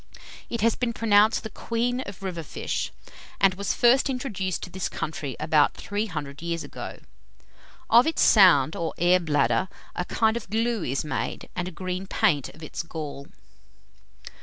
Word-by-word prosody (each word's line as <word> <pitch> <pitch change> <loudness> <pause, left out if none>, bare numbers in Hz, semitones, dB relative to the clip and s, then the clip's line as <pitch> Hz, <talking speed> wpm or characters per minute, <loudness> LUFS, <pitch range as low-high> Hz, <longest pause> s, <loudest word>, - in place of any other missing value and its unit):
It 235 - -3
has 230 +1 +3
been 245 -2 -1
pronounced 215 -1 +4
the 220 - -6
queen 240 +4 -1
of 200 -1 -9
river 180 -3 -3
fish, 155 - -3 0.5
and 195 -1 +5
was 200 +1 -2
first 255 +3 +4
introduced 210 -9 -3
to 180 - -7
this 190 0 -3
country 145 -4 -4
about 155 -1 +3
three 205 +2 -3
hundred 145 -5 -6
years 170 -1 -3
ago. - - -8 0.9
Of 235 +5 +6
its 320 - +2
sound, 165 - +6
or 165 -1 -3
air 180 +1 +4
bladder, 165 +3 +1 0.3
a 180 - -2
kind 220 +4 +1
of 235 -5 -5
glue 225 -1 0
is 135 +2 -2
made, 150 - -4
and 180 -1 -2
a - - -5
green 185 +2 -4
paint 145 -7 +1
of 155 - -14
its 155 - -4
gall. 150 -4 -7
185 Hz, 165 wpm, -26 LUFS, 160-225 Hz, 0.9 s, Of